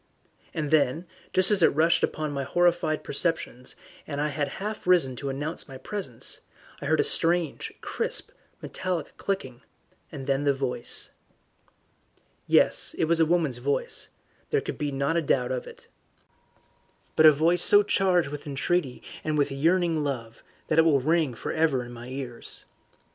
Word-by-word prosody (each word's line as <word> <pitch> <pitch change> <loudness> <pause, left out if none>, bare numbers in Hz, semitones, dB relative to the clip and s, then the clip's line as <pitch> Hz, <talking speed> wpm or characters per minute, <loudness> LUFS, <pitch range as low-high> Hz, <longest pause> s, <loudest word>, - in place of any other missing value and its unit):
And 155 -3 -3
then, 155 +2 +2 0.3
just 185 +2 +5
as 205 -3 +4
it 160 - +4
rushed 165 +2 +3
upon 155 -1 -1
my 140 -1 -2
horrified 175 +1 +1
perceptions, 140 -5 -2 0.3
and 145 -2 -4
I 150 +1 0
had 145 0 -1
half 210 -1 -6
risen 165 -8 +3
to 140 - -4
announce 145 +5 -3
my 135 - -8
presence, 130 - -5 0.4
I 140 - -4
heard 155 +1 +2
a - - +5
strange, 170 -2 +1
crisp, - - -2 0.3
metallic 180 -4 -4
clicking, 130 -11 -4 0.5
and 140 -4 -7
then 135 +1 0
the 140 -1 +2
voice. 130 -3 -3 1.4
Yes, - - +3
it - - +2
was 165 +1 +2
a 160 - +4
woman's 160 -7 +1
voice; 140 +3 -2 0.4
there - - +2
could - - -6
not 140 +1 0
be 170 - +2
a - - -1
doubt 130 -4 +1
of 125 -1 -3
it. - - -13 1.3
But 155 - +7
a - - +10
voice 165 +4 +2
so 205 +3 +6
charged 185 -6 +2
with 145 +1 -7
entreaty 140 0 -1 0.2
and 155 -1 -1
with 145 -1 +1
yearning 165 +2 +1
love, 115 -5 -5 0.3
that - - +3
it - - +7
will 155 -4 +4
ring 155 -2 +1
for - - -5
ever 155 -6 +1
in 120 - -10
my 120 0 -9
ears. 130 -2 -6
150 Hz, 165 wpm, -26 LUFS, 135-170 Hz, 1.4 s, a